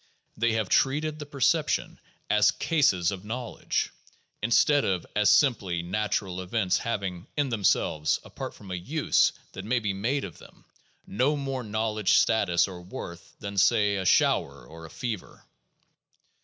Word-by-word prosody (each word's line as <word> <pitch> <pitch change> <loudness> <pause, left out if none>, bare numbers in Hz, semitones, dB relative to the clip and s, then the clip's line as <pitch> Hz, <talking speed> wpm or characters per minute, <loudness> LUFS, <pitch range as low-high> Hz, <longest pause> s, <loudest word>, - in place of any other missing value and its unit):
They 115 +1 +1
have 110 -3 0
treated 150 +8 +1
the 150 - -7
perceptions 140 -3 0 0.3
as 105 0 +4
cases 100 - +2
of 95 -1 -6
knowledge, 120 +3 -3 0.5
instead 140 +6 +3
of 90 -3 -1
as 105 0 +4
simply 105 -7 +2
natural 95 0 -2
events 95 0 0
having, 100 -6 -4
in 145 -2 +1
themselves 90 -8 +1
(apart - - -7
from 95 - -12
a - - -2
use 145 - +2 0.2
that 95 - -8
may 120 +5 0
be 105 -4 -1
made 120 +9 -1
of - - -8
them), - - -17 0.4
no 130 +8 +1
more 135 -3 -3
knowledge 110 -1 0
status 100 -7 +3
or 90 -2 -9
worth 85 -1 -9
than, 100 -2 -3
say, 100 0 +3
a 95 - -2
shower - - +2
or 80 +5 -11
a - - -16
fever. 110 -2 -6
105 Hz, 150 wpm, -27 LUFS, 95-125 Hz, 0.5 s, as